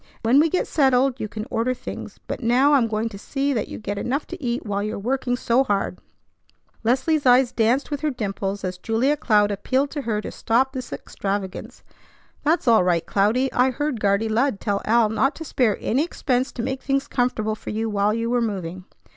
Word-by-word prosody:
When 240 +5 +5
we 320 +2 +4
get 365 - 0
settled, 265 -2 +2
you 215 - -3
can 215 +1 -6
order 245 +3 0
things; - - -8
but - - -5
now 255 +5 +4
I'm 255 -5 +4
going 220 0 -1
to 200 -3 -10
see 275 +5 -1
that 220 -5 -1
you - - -7
get 205 -1 -4
enough 275 +4 -2
to 355 - -8
eat 240 0 -2
while 200 -1 -1
you're 215 +1 -3
working 245 +3 -1
so 245 +1 +2
hard." 205 -6 -1 0.8
Leslie's 265 +5 +1
eyes 250 0 +5
danced 240 +6 +1
with 290 - -3
her 310 - +1
dimples 200 -5 -3
as 180 -1 -4
Julia 235 +9 +1
Cloud 210 -7 +2
appealed 260 +8 0
to 295 - -3
her 225 -5 -1
to - - -6
stop 260 +4 +1
this 255 -3 -6
extravagance. 195 -1 -5 0.6
"That's 310 -1 +1
all 225 -5 +6
right, 170 -2 +1
Cloudy. 225 +7 +1
I 250 +1 +3
heard 270 -1 -2
Guardy 200 +2 +2
Lud 225 0 +1
tell 200 -2 -1
Al 230 0 +4
not 265 +6 +1
to 320 - -7
spare 240 -7 +1
any 265 +6 +1
expense 260 -6 -1
to 235 - -4
make 265 +1 -3
things 275 0 0
comfortable 245 -4 0
for 215 - -8
you 220 +1 -2
while 205 -1 +1
you 230 +1 -1
were 245 -1 +2
moving." 185 -5 -4
235 Hz, 205 wpm, -23 LUFS, 210-265 Hz, 0.8 s, all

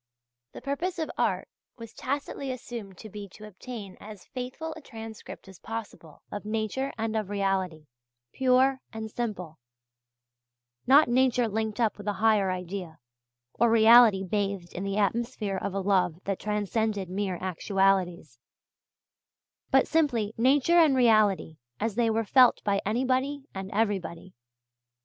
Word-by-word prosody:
The - - -9
purpose 320 +7 -2
of 320 -2 -3
art - - 0 0.3
was 230 -2 -10
tacitly 275 0 -4
assumed 230 -6 -7
to 220 - -10
be 205 -1 -9
to 215 - -11
obtain 210 -1 -9
as 210 -2 -11
faithful 260 +6 -6
a 320 - -11
transcript 225 -7 -10
as 190 -2 -13
possible 215 -8 -8
of 205 - -5
nature 220 +5 -2
and 225 0 -2
of 215 -3 -2
reality, 190 -6 -1 0.5
pure 260 +1 +3
and 220 -1 -6
simple 185 -10 -5 1.3
not 280 +4 +7
nature 250 -1 +2
linked 220 0 -3
up 225 -3 +1
with 205 - -9
a 205 - +1
higher 210 -1 +2
idea, 180 -2 -5 0.6
or 235 - +3
reality 225 -3 +7
bathed 195 -2 -2
in 185 - -5
the 195 0 -2
atmosphere 215 -1 -1
of 200 0 -3
a - - 0
love 185 -4 +2
that 195 -1 -2
transcended 210 -1 -1
mere 190 0 -2
actualities 185 - 0 1.3
but - - +4
simply 245 -10 +1
nature 280 +8 +4
and 310 -5 +5
reality 215 -9 +3 0.2
as 220 0 -1
they 230 +1 +1
were 225 0 0
felt 250 +3 +5
by 200 -1 +1
anybody 260 +5 0
and 190 0 -6
everybody. 195 -5 -2
215 Hz, 140 wpm, -27 LUFS, 195-245 Hz, 1.3 s, not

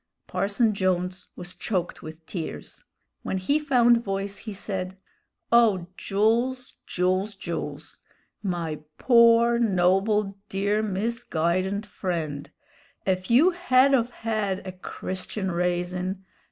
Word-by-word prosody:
Parson 210 +3 +1
Jones 185 -1 -1
was 175 -1 -8
choked 180 -5 -2
with 160 +1 -10
tears. 165 -3 -7 0.4
When 190 - -2
he 280 +12 +1
found 240 -5 +4
voice 195 0 -3
he 220 - -7
said: 190 -2 -4 0.5
"O 220 -7 +4
Jools, 235 +7 0
Jools, 185 +3 0
Jools! 170 -3 -6 0.4
my 170 -6 -3 0.2
pore, 235 -1 +5
noble, 195 0 +2
dear, 200 +2 0
misguidened 200 -2 -1
friend! 160 -8 -4 0.6
ef 185 -1 -1
you 285 +11 +6
hed 275 -6 +3
of 240 -3 +3
hed 215 -6 -2
a 185 - -4
Christian 185 +1 -5
raisin'! 180 +2 -2
195 Hz, 110 wpm, -26 LUFS, 185-230 Hz, 0.6 s, you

